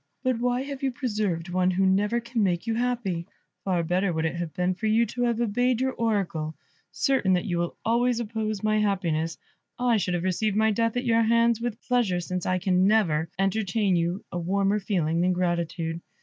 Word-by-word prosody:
But 255 -3 +1
why 245 +1 0
have 275 -1 -6
you 270 -1 0
preserved 210 - -2
one 180 +1 +2
who 190 +1 +1
never 205 +5 +2
can 235 0 -2
make 180 -2 0
you 230 - 0
happy? 225 -8 -1 0.4
Far 180 -3 0
better 180 +3 +1
would 160 -1 -1
it 160 - 0
have 170 -2 -4
been 180 +2 0
for 190 +4 -3
you 225 +2 +3
to 245 +3 -5
have 235 -1 0
obeyed 240 +2 +1
your 260 0 +1
Oracle. 195 -10 -1 0.4
Certain 260 -9 +1
that 180 - +1
you 175 -4 -1
will 170 0 -3
always 240 +1 +2
oppose 215 -2 -3
my 215 0 +2
happiness, 170 -6 0 0.4
I 245 -2 +2
should 180 -3 -1
have 175 - -2
received 195 +3 0
my 220 0 +3
death 230 +2 0
at 245 - -1
your 230 -1 +3
hands 230 0 +3
with 240 -1 -4
pleasure, 235 -8 +2
since 180 0 -4
I 185 - +2
can 185 +1 +2
never 165 -8 +2
entertain 195 +1 +1
for 175 - +3
you 175 +4 -2
a 175 - -3
warmer 195 +4 +1
feeling 170 -5 0
than 180 +1 +2
gratitude. 170 -2 -2
200 Hz, 205 wpm, -26 LUFS, 175-230 Hz, 0.4 s, you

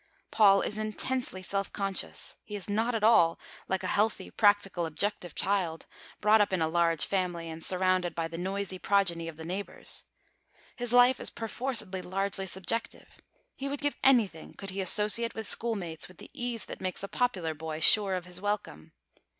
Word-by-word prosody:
Paul 195 -3 +5
is 210 - -2
intensely 215 -2 -3
self 195 +1 -3
conscious. 195 -1 -2
He 210 - -8
is 200 - -3
not 225 +4 0
at 220 - -2
all 190 -7 +5 0.3
like 190 0 -2
a 185 - -1
healthy, 215 +2 0
practical, 205 -5 +2
objective 175 0 -2
child, 185 -4 -1 0.4
brought 215 +1 +5
up 205 - +1
in 185 - 0
a 160 - +1
large 165 -1 +2
family, 180 -3 -2
and 160 0 -9
surrounded 185 -1 +2
by 165 -1 -2
the 165 - -9
noisy 190 0 -3
progeny 180 -5 +1
of 165 -2 -8
neighbours. 180 +5 -4 0.7
His 245 -2 -3
life 245 +1 +5
is - - -2
perforcedly 225 -4 -2
largely 195 +1 -3
subjective. 190 +5 -3 0.4
He 275 +1 -4
would 285 0 -4
give 290 0 0
anything 225 -11 +2
could 195 -1 -6
he 195 +1 -3
associate 210 +5 +5
with 220 - -5
schoolmates 195 -9 -2
with 180 - -17
the - - -13
ease 240 -2 -3
that - - -9
makes 185 +1 -3
a - - -3
popular 190 -10 -1
boy 155 0 -6
sure 195 +3 +6
of 180 -1 -5
his 180 0 -7
welcome. 200 - -4
195 Hz, 175 wpm, -29 LUFS, 175-215 Hz, 0.7 s, sure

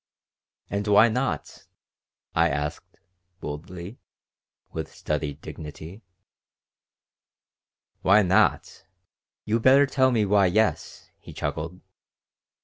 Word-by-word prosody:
"And 100 +1 -3
why 105 +3 +6
not?" 125 +4 -3 0.7
I 85 +1 +3
asked, 75 +1 -5 0.4
boldly, 85 +7 -8 0.7
with 80 -1 -5
studied 75 -1 -4
dignity 80 +6 -9 2.0
"Why 100 +3 +5
not! 95 +4 +1 0.6
You 110 +2 +1
better 135 +4 +6
tell 130 -1 +2
me 115 -4 +2
why 100 -1 +4
yes," 110 +4 -1
he - - -12
chuckled. 85 +4 -4
95 Hz, 90 wpm, -25 LUFS, 80-110 Hz, 2.0 s, why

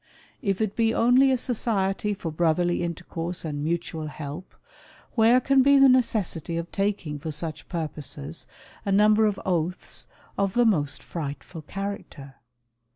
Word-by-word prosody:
If 200 -4 0
it 215 -2 -1
be 225 -1 +2
only 255 +3 +5
a 260 - +3
society 210 -4 -1
for 165 -4 -5
brotherly 175 +2 +1
intercourse 170 0 -4
and 145 -2 -3
mutual 165 -1 -2
help, 150 +4 -7 0.6
where 230 +2 +5
can 270 +1 +4
be 280 +1 +6
the 275 0 +8
necessity 210 - +1
of 170 +1 -4
taking 195 -7 -1
for 160 +2 -5
such 155 0 -6
purposes, 155 -2 -5 0.4
a 200 - -1
number 210 +2 +5
of 205 -2 -1
oaths 180 -1 -2 0.3
of 195 -1 0
the 240 0 +4
most 150 -10 +1
frightful 160 +1 -6
character 155 -7 -7
180 Hz, 145 wpm, -26 LUFS, 160-215 Hz, 0.6 s, the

